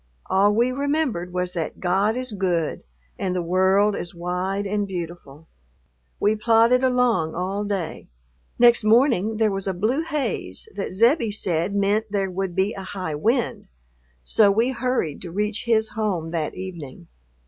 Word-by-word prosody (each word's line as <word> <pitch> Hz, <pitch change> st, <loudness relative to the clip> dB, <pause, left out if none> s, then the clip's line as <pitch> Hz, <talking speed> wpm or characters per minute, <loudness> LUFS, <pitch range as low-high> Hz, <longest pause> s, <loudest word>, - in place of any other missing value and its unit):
All 200 Hz, +2 st, +4 dB
we 240 Hz, +3 st, +2 dB
remembered 275 Hz, -, -1 dB
was 180 Hz, 0 st, -2 dB
that 165 Hz, -4 st, -4 dB
God 195 Hz, +5 st, +1 dB
is 255 Hz, -1 st, -3 dB
good 180 Hz, -5 st, -1 dB, 0.4 s
and 185 Hz, -1 st, -1 dB
the 180 Hz, -, 0 dB
world 190 Hz, +4 st, +3 dB
is 175 Hz, 0 st, -6 dB
wide 180 Hz, +3 st, -2 dB
and 205 Hz, 0 st, -1 dB
beautiful. 170 Hz, -4 st, -7 dB, 0.7 s
We 210 Hz, +1 st, +2 dB
plodded 230 Hz, +3 st, +4 dB
along 245 Hz, -11 st, +2 dB
all 190 Hz, +3 st, -2 dB
day. 195 Hz, -6 st, -4 dB, 0.5 s
Next 240 Hz, -1 st, +5 dB
morning 220 Hz, -2 st, +3 dB
there 220 Hz, -1 st, +2 dB
was 195 Hz, 0 st, -2 dB
a 190 Hz, -, -1 dB
blue 225 Hz, -, 0 dB
haze 255 Hz, -, -3 dB
that 200 Hz, -, -4 dB
Zebbie 230 Hz, -, +3 dB
said 190 Hz, -2 st, 0 dB
meant 205 Hz, +2 st, +1 dB
there 195 Hz, -2 st, -1 dB
would 185 Hz, -1 st, -3 dB
be 195 Hz, +3 st, +1 dB
a 195 Hz, -, -7 dB
high 185 Hz, -4 st, -5 dB
wind, 230 Hz, -, -1 dB, 0.6 s
so 205 Hz, -, +4 dB
we 225 Hz, +6 st, +2 dB
hurried 250 Hz, -, -2 dB
to 175 Hz, -, -7 dB
reach 210 Hz, +3 st, -2 dB
his 220 Hz, -2 st, +2 dB
home 185 Hz, -7 st, -2 dB
that 160 Hz, -3 st, -2 dB
evening. 170 Hz, -, -8 dB
200 Hz, 160 wpm, -23 LUFS, 180-225 Hz, 0.7 s, Next